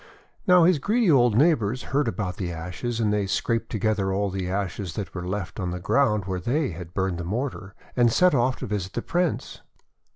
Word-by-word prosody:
Now, 180 -2 +7
his 170 -2 +4
greedy 215 - +2
old 120 -6 +4
neighbours 125 -6 +2
heard 145 -2 +2
about 95 -5 -3
the 90 -3 -3
ashes, 90 +8 -4
and 105 -2 +1
they 105 -2 0
scraped 115 +4 -1
together 105 -3 0
all 100 +1 0
the 95 -1 -3
ashes 95 -2 -3
that 100 -3 -5
were 90 -1 -5
left 95 -5 -4
on 90 - -2
the 90 0 -4
ground 105 0 +2
where 95 -1 -2
they 130 - 0
had 85 +1 -9
burned 95 -3 -1
the - - -3
mortar, 105 0 -4 0.2
and 120 -2 +4
set 180 +7 +4
off 130 -1 +2
to - - -6
visit 100 -3 -3
the 120 - -3
Prince. 175 -1 -1
105 Hz, 205 wpm, -25 LUFS, 95-125 Hz, 0.2 s, Now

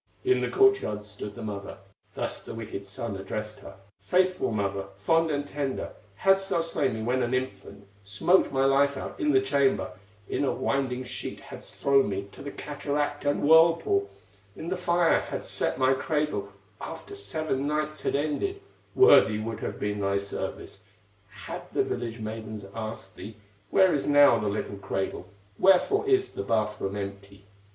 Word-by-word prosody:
In 385 0 +3
the - - -1
court 400 0 +5
yard 105 0 -4
stood 105 0 -8
the - - -7
mother, 100 -2 -6 0.4
Thus - - -3
the - - -8
wicked 105 -3 -6
son 100 +2 -5
addressed 105 +2 -5
her: - - -11 0.3
"Faithful 185 -4 +1
mother, 100 -2 -1
fond 165 +12 +2
and 145 -1 -1
tender, 140 -2 -3 0.2
Hadst 195 - +3
thou 170 - +2
slain 150 -7 -1
me 110 - -4
when 125 +3 +1
an 120 +1 0
infant, 100 -5 -5 0.2
Smoked 105 - +3
my 135 0 +2
life 140 +1 +3
out - - -7
in 150 - +2
the 135 - +5
chamber, 135 -3 +1 0.4
In - - -1
a 140 - +2
winding 130 -1 -1
sheet 125 - -5
hadst - - -11
thrown 135 -4 +3
me 100 0 -3
To - - -12
the 140 - -5
cataract 145 0 -3
and 145 - +1
whirlpool, 170 - +5 0.5
In 165 - -6
the 185 - 0
fire 175 -1 +3
hadst - - -5
set - - 0
my 130 0 +4
cradle, 150 -8 -1 0.3
After 165 - -8
seven 155 - -2
nights 150 0 -2
had - - -1
ended, 155 - -1 0.4
Worthy 110 - +7
would 110 +1 -4
have - - -5
been 105 0 -2
thy 100 0 +1
service. 100 0 -5 0.5
Had - - -7
the - - +2
village 115 -1 -4
maidens 110 -1 -6
asked 110 -3 -6
thee: 110 0 -9 0.3
'Where 190 -2 +5
is 140 - -1
now 145 -5 +6
the 105 - -2
little 100 0 -3
cradle, 95 -1 -4 0.3
Wherefore 405 - +4
is 390 -1 +3
the - - -5
bath 105 0 -1
room 95 +1 -2
empty? 100 0 -7
130 Hz, 175 wpm, -27 LUFS, 105-155 Hz, 0.5 s, Worthy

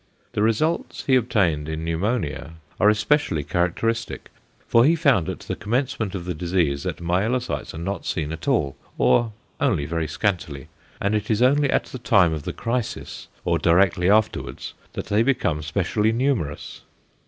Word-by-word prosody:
The - - -2
results 115 +10 0
he 130 - +4
obtained 95 -12 +1
in 80 0 -4
pneumonia 85 -2 -2 0.3
are 105 - +6
especially 110 - +1
characteristic, 110 +8 -1 0.4
for 115 - +5
he 160 +6 +5
found 140 - +2
at - - -5
the - - -4
commencement 115 -2 -2
of 90 -2 -5
the 90 - -2
disease 85 -4 0
that - - -4
myelocytes 105 +6 -1
are - - -6
not 95 +4 -4
seen 75 -3 -2
at 80 +8 -8
all 85 - +1 0.2
or 115 - +3 0.3
only 100 - +1
very 80 +1 -2
scantily: 80 -6 -2 0.3
and 100 +1 0
it 105 -1 -1
is 110 +2 +2
only 140 +2 +4
at - - +2
the 130 - -9
time 95 -8 +4
of 75 -2 -5
the - - -2
crisis, 120 -1 -3 0.2
or - - +1
directly 90 +1 +3
afterwards, 110 +1 0 0.2
that - - -4
they 105 +2 +2
become 100 - +1
specially 100 +7 0
numerous. 115 - -2
100 Hz, 165 wpm, -23 LUFS, 85-120 Hz, 0.4 s, are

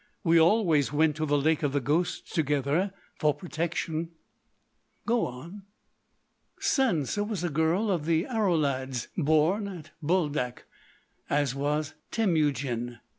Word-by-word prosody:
We 165 -2 +5
always 165 - +3
went 150 0 +2
to 155 0 -1
the 145 0 +2
Lake 155 +3 +2
of 145 -3 0
the 145 - +2
Ghosts 150 +7 -1
together—for 150 +2 0
protection——" 165 -2 -3 1.0
"Go 235 0 +1
on!" 165 +11 -9 1.0
"Sansa 250 - +1
was 205 -5 -3
a 175 - -1
girl 165 +8 +1
of 165 -4 -1
the 165 0 +2
Aroulads, 145 - 0
born 160 +6 +2
at 175 -6 -9
Buldak—as 145 -3 -2
was 150 +2 -1 0.2
Temujin. 140 - 0
160 Hz, 115 wpm, -28 LUFS, 145-180 Hz, 1.0 s, We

